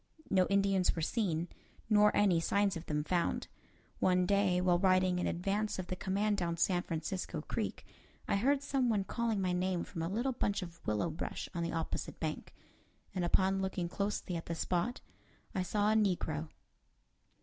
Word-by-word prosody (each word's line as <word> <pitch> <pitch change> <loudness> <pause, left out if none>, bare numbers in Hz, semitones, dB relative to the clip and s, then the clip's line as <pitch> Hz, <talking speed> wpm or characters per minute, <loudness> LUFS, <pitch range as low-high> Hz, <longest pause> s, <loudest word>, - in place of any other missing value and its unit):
No 185 -1 +4
Indians 195 -2 +2
were 165 - -2
seen, 175 -4 0 0.4
nor 210 -1 +6
any 195 -5 +4
signs 200 +3 +1
of 165 +1 -7
them 150 -1 0
found. 170 +2 0 0.5
One 180 -1 +3
day, 195 -1 +3
while 180 -1 +3
riding 185 -1 +3
in - - 0
advance 200 +5 -1
of 185 - -3
the 185 - -4
command 200 +3 0
down 170 -2 -1
San 175 +1 +2
Francisco 165 0 -3
Creek, 220 - -3 0.4
I - - +2
heard 275 +6 +2
some 265 -3 +1
one 210 -3 +2
calling 230 0 -1
my 185 -2 +1
name 180 0 0
from 165 - -6
a 165 - -1
little 240 +7 0
bunch 205 -5 -1
of 165 -2 -10
willow 105 +10 0
brush 160 - -5
on 170 - -2
the 170 - -1
opposite 165 -1 -3
bank, 155 -1 -4 0.6
and 185 -2 -1
upon 190 +2 +2
looking 190 -2 -2
closely 200 0 -2
at 165 - -5
the 170 - -2
spot, 180 +8 -1 0.5
I 190 - 0
saw 205 +3 +1
a - - +3
negro. 165 -7 0
185 Hz, 180 wpm, -33 LUFS, 170-205 Hz, 0.6 s, nor